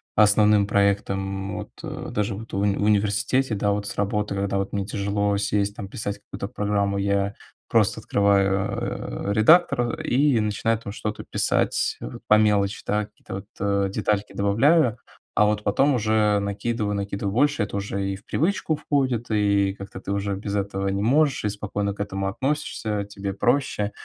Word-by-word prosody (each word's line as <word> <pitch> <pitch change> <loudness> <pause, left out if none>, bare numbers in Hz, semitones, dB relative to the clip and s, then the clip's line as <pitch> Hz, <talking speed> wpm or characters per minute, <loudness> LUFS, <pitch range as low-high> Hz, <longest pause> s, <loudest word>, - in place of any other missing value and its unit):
основным 105 -1 +5
проектам 100 -1 0
вот, - - -7
э, - - -6
даже 105 +1 -1
вот 115 +2 -10
в - - -1
уни 100 0 +2
в - - -1
университете, 110 +5 +2
да. 100 +1 +1
Вот 100 0 -1
с - - -5
работой, 105 0 -1
когда 100 0 -1
вот 100 +1 -3
мне 100 -1 -1
тяжело 100 0 0
сесть, 100 0 0
там 100 - -6
писать 100 0 -5
какую-то 100 - -6
программу, 100 -1 -1
я 100 0 0 0.3
просто 110 -1 +2
открываю, 100 - 0
э, - - +1
редактор, 120 - +4
э, - - -5
и 135 -1 +3
начинаю 105 +1 0
там 100 - -7
что-то 105 -1 -4
писать - - 0
вот - - -8
по 105 - +6
мелочи, 105 -2 +2
да, 105 0 +1
какие-то 105 - -12
вот, 95 - -6
э, 100 0 +1
детальки 105 0 -1
добавляю. 120 +6 +3 0.4
А 105 - +6
вот 105 0 0
потом 135 +8 +3
уже 110 -2 +2
накидываю, 105 +1 -2
накидываю 100 0 -3
больше. 130 -2 +2
Это 100 - -5
уже 100 -1 -2
и - - -4
в 95 - -13
привычку 170 -1 0
входит, 130 -6 0
и 100 -2 +2
как-то 100 -1 -8
ты 100 - -4
уже 100 0 -1
без 100 0 -4
этого 100 -1 -2
не 100 +1 -1
можешь 140 +5 +2
и 105 - +1
спокойно 100 0 -3
к - - -18
этому 95 -1 -2
относишься. 110 -4 -2
Тебе 100 -1 -5
проще. 105 -1 0
105 Hz, 175 wpm, -24 LUFS, 100-110 Hz, 0.4 s, по